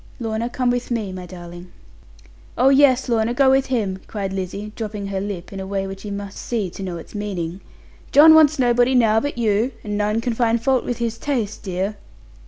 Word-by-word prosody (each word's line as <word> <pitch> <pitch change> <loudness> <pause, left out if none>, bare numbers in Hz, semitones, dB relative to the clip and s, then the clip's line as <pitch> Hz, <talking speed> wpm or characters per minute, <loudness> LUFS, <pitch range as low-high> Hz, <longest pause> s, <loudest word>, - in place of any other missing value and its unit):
Lorna, 225 0 -2
come 245 0 0
with 245 0 -2
me, 220 -5 -2
my 185 -1 -7
darling.' 175 0 -10 0.9
'Oh 260 - +5
yes, 270 -2 +4
Lorna; 230 0 +1
go 265 0 +5
with 270 0 +3
him,' 210 -7 -1
cried 195 -3 -4
Lizzie, 195 +2 -5
dropping 210 -2 -5
her 195 -1 -3
lip, 195 -2 -6
in 195 - -6
a 190 - -5
way 195 0 -2
which 195 0 -8
you 205 - -6
must 200 -1 -6
see 215 -7 -2
to 195 - -9
know 180 -3 -4
its 165 - -11
meaning; 190 -4 -4 0.5
'John 315 +3 +8
wants 310 -1 +6
nobody 245 0 +3
now 220 -3 +4
but 285 +1 -4
you; 225 +2 +1
and 210 -1 -3
none 210 +2 +1
can 235 +1 -1
find 230 0 +1
fault 260 +2 +1
with 245 - -2
his 230 -1 -3
taste, 235 -8 -2
dear.' 195 +1 -3
215 Hz, 205 wpm, -21 LUFS, 195-245 Hz, 0.9 s, John